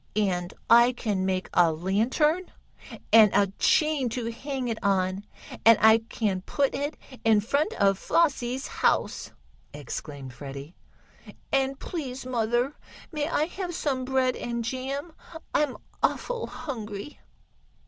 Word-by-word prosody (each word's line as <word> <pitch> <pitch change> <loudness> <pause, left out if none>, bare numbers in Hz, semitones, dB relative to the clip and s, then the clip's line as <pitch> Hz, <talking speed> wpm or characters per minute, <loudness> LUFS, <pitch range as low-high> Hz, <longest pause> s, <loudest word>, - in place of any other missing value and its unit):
"And 185 -4 0 0.2
I 235 +2 +6
can 200 -6 -1
make 185 0 -1
a 170 -2 +5
lantern, 235 - +1 0.6
and 220 -2 +9
a 200 -1 +3
chain 305 -5 +3
to 230 0 -3
hang 265 +1 -4
it 225 -2 -3
on, 190 0 +1 0.4
and 230 -1 +8
I 220 +1 +7
can 215 -4 -2
put 275 +8 0
it 290 +2 -3 0.3
in 220 -2 +5
front 280 - 0
of 195 -1 +2
Flossie's 265 -5 +1
house!" - - 0 0.5
exclaimed 140 -2 -7
Freddie. 140 +4 -9 0.8
"And, 270 0 +1
please, 270 -7 -5
mother, 240 +2 0 0.4
may 300 -1 -2
I 300 - +1
have 355 0 -5
some 265 -5 -1
bread 260 -1 +1
and 235 -1 -3
jam. 270 +6 -4 0.4
I'm 295 -4 +1 0.2
awful - - -1
hungry." 220 -2 -7
240 Hz, 130 wpm, -27 LUFS, 200-275 Hz, 0.8 s, and